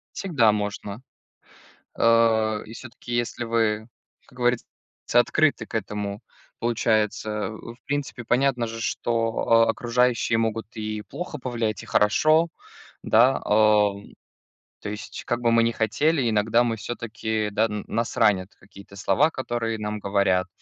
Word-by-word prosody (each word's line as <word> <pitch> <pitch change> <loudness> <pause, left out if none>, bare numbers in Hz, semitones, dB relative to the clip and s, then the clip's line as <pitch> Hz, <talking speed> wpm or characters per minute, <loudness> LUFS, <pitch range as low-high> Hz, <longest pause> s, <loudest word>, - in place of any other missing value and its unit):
Всегда 145 - +2
можно. 105 +1 -4 0.9
А. 110 -2 +3
И 110 - -11
всё-таки 120 0 -8
если 120 0 -2
вы, 110 -2 0 0.4
как 125 - -21
говорится, 120 -1 +1 0.5
открыты 145 +5 +3
к - - -13
этому, 105 -1 -3 0.4
получается. 110 -2 0
В 115 +1 -10
принципе, 140 -4 -3
понятно 125 0 +1
же, 115 0 -7
что 115 0 +1
окружающие 120 0 +1
могут 115 -1 -1
и 110 -1 -4
плохо 165 +5 -7
повлиять, 120 -4 -3
и - - -12
хорошо, 155 +10 +3 0.5
да, 120 +4 +4
о. 105 -1 +3 0.8
То 105 - -5
есть 105 0 -7
как 120 0 -1
бы 120 -1 +2
мы 115 0 +4
ни 115 - +1
хотели, 120 +5 +1
иногда 110 +2 +3
мы 115 -2 -1
все-таки, 110 -1 -3
да, 105 +2 +1
н 105 -1 -5
нас 115 +1 -2
ранят 100 -4 +2
какие-то 100 0 -16
слова, 140 +10 +2
которые 120 -5 -3
нам 105 0 -4
говорят, 100 -2 +1
115 Hz, 135 wpm, -24 LUFS, 105-120 Hz, 0.9 s, да